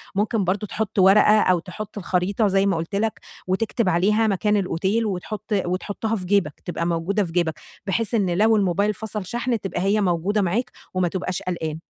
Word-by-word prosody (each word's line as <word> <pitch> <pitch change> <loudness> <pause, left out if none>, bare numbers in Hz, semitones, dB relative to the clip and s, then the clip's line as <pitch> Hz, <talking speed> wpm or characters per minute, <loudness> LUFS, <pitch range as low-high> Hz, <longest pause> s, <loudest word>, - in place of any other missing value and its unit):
ممكن 210 +1 +1
برضه 195 +3 -1
تحط 220 0 -2
ورقة 210 +3 +6
أو 185 -4 +3
تحط 200 +4 -8
الخريطة 195 +3 0
زي 195 0 +2
ما 195 -4 +1
قُلت 165 +5 -4
لك، 210 -2 -1 0.3
وتكتب 210 +2 0
عليها 210 +6 +2
مكان 210 +1 +1
الأوتيل 195 +4 0
وتحط 205 +2 -4 0.2
وتحطها 205 +5 -2
في 185 -4 -5
جيبك، 180 -6 +1
تبقى 170 -1 -3
موجودة 175 +5 0
في 165 - -6
جيبك، 170 -2 +1 0.3
بحيث 225 +4 -1
إن 200 -5 +1
لو 220 +1 +4
الموبايل 200 +1 +1
فصل 210 -1 -5
شحن 235 +2 -1
تبقى 180 -2 -4
هي 205 +2 +2
موجودة 190 +3 +1
معاك 200 +7 -1 0.2
وما 185 -1 +1
تبقاش 185 0 -3
قلقان. 160 -3 -3
195 Hz, 180 wpm, -23 LUFS, 180-215 Hz, 0.3 s, ورقة